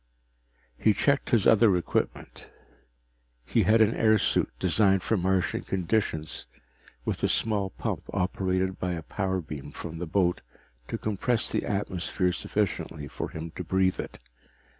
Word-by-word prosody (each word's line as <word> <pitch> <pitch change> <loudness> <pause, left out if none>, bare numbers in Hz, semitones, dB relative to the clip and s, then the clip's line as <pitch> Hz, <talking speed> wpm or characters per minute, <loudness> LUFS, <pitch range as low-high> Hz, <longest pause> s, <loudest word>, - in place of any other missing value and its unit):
He 110 -2 +4
checked 140 -1 +1
his 115 -5 +3
other 105 -4 +6
equipment. 85 - -3 1.0
He - - +2
had 110 +1 +4
an 110 0 +5
airsuit 110 -3 +3
designed 95 0 +3
for 115 - +1
Martian 95 -1 +1
conditions, 90 -4 -1 0.6
with - - -2
a - - +3
small 105 -3 +1
pump - - -4
operated 95 0 -1
by 90 -1 -1
a 80 -2 -5
power 95 +1 -2
beam 75 -2 -8
from 80 +1 -7
the 90 - -4
boat 90 +1 +1 0.5
to - - -3
compress 110 +3 0
the - - -1
atmosphere 95 -2 -1
sufficiently 90 -8 -2
for - - -5
him 80 +1 -7
to 90 - -6
breathe 95 +2 +1
it. - - -5
95 Hz, 140 wpm, -27 LUFS, 90-105 Hz, 1.0 s, other